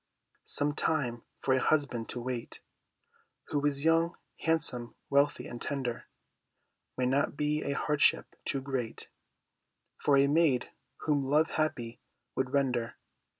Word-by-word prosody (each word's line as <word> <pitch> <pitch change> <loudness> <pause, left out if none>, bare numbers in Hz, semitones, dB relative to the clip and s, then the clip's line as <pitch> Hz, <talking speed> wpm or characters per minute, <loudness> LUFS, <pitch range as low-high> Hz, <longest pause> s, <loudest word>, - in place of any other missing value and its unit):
Some 145 0 +1
time 130 -7 0 0.2
for 130 - +2
a 130 - +3
husband 140 -7 +1
to 125 - -4
wait 120 -1 -5 0.9
Who 145 -1 0
is 140 +1 -1
young, 165 +1 +3 0.2
handsome, 125 -7 0 0.2
wealthy, 140 +1 +3
and 120 - -7
tender, 130 -4 -3 0.9
May 125 - +1
not 140 +2 +1
be 150 +1 +1
a 140 - -1
hardship 150 0 +2
too 135 - -1
great 130 -4 -4 0.9
For 140 -1 +4
a 135 - +6
maid 145 -4 +3 0.3
whom 145 -2 +1
love 150 +4 +3
happy 120 -7 -1 0.3
would 130 -1 -1
render. 125 -4 0
140 Hz, 130 wpm, -31 LUFS, 125-150 Hz, 0.9 s, a